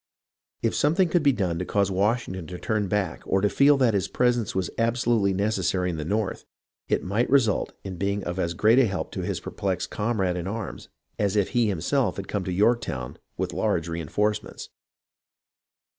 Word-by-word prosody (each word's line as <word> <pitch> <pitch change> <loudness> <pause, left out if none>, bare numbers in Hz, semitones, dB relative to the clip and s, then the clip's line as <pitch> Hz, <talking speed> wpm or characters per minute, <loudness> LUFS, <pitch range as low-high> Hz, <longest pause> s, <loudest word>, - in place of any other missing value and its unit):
If - - +1
something 165 +5 +2
could 175 +1 +2
be 145 -1 +5
done 90 -8 -1
to - - -1
cause 100 0 +1
Washington 95 -3 0
to 90 - -6
turn 105 +1 -1
back 95 -3 -1
or 95 - +2
to 105 - +2
feel 140 +1 +5
that 125 -4 +3
his 100 -3 0
presence 120 -5 +1
was 95 -1 -1
absolutely 115 -3 +2
necessary 95 -2 0
in 80 - -5
the 75 - -3
North, 105 +4 -2 0.4
it - - 0
might 105 +6 0
result 125 -7 +2
in 95 -2 -6
being 100 +2 -1
of 90 +2 -4
as 85 -1 -1
great 110 +8 +5
help 105 -7 0
to - - -4
his - - -2
perplexed - - -3
comrade 100 -5 0
in 90 +1 -4
arms 110 +3 -5 0.3
as 100 -1 +1
if 100 -2 +2
he 120 -3 +2
himself 105 - 0
had 100 - -6
come 100 -2 -2
to 95 - -2
Yorktown 95 - 0 0.2
with - - -2
large 80 - 0
reenforcements. 95 +6 -2
100 Hz, 185 wpm, -25 LUFS, 90-115 Hz, 0.4 s, be